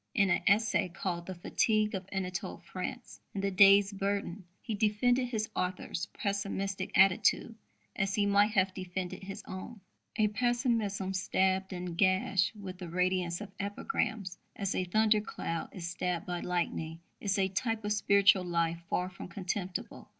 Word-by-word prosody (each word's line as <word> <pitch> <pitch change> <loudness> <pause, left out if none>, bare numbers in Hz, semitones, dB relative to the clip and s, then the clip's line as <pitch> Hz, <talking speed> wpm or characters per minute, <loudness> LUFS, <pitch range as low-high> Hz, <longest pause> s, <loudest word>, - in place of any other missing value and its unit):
In 200 -5 +4
an - - +2
essay 205 -2 +3
called 175 -1 -4
The 185 - -5
Fatigue 215 +4 +1
of 190 -1 -5
Anatole 185 -2 -3
France 185 +8 -7 0.2
in 195 - -1
The 195 0 0
Day's 200 +1 +7
Burden 195 -2 -2
he 225 - -5
defended 230 +4 +2
his 220 -3 -2
author's 180 0 -2
pessimistic 200 -2 -2
attitude 190 +4 +4 0.4
as 195 0 0
he 205 - +2
might 200 +1 +4
have 190 -1 +2
defended 185 0 -5
his 195 +1 -7
own: 190 +4 -7 0.4
A 215 -2 +3
pessimism, 220 -4 0
stabbed 190 +1 +1
and 180 -2 -5
gashed 185 +1 +2
with 185 -3 -8
the 180 -3 -6
radiance 180 0 0
of 205 -2 -7
epigrams, 205 - -2 0.2
as 195 -1 -1
a 185 - 0
thundercloud 210 -4 0
is 175 -3 -6
stabbed 180 -1 -2
by 175 -1 -3
lightning, 165 -2 -2 0.2
is 200 -1 0
a 190 -1 +3
type 225 +2 -2
of 210 - +1
spiritual 200 -2 +5
life 170 -1 0
far 180 - 0
from 185 - -9
contemptible. 185 +1 -4
195 Hz, 155 wpm, -31 LUFS, 180-205 Hz, 0.4 s, Day's